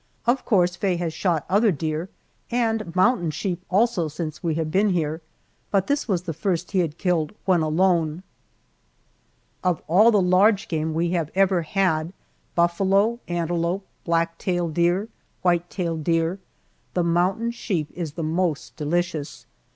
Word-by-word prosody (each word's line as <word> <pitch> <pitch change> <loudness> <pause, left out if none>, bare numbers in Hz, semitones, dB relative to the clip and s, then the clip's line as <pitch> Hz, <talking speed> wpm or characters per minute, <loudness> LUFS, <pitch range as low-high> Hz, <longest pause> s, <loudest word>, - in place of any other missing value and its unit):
Of 245 +2 +1
course 180 -5 +3
Faye 190 -1 0
has 170 -2 -2
shot 170 -4 0
other 205 +3 +3
deer, 160 +2 -3 0.4
and 225 -7 -1
mountain 185 -3 +3
sheep 175 +3 -3
also, 195 -3 +2
since 155 0 -5
we 165 -3 -1
have 160 -1 -2
been 200 +4 +3
here, 160 -3 -1 0.5
but 195 -2 +2
this 285 -2 0
was 185 -5 0
the 170 -3 -4
first 175 +2 -2
he 195 - +1
had 165 -3 -1
killed 175 -3 0
when 185 -3 +3
alone. 165 0 +1 1.4
Of 180 -3 0
all 200 +8 +6
the 210 -3 +4
large 195 +3 +3
game 160 -1 -2
we 170 +1 0
have 165 -4 -1
ever 190 -2 +3
had 165 -1 0 0.4
buffalo, 195 +6 +2
antelope, 175 +2 -1 0.2
black 165 0 0
tail 175 -2 -1
deer, 175 +6 +1 0.4
white 175 -1 +2
tail 170 -4 -2
deer 165 +3 0 0.6
the 180 - +2
mountain 180 +7 +1
sheep 180 -10 -3
is 165 -5 -5
the 165 - -4
most 160 -1 -1
delicious. 160 -1 -2
175 Hz, 150 wpm, -24 LUFS, 165-195 Hz, 1.4 s, all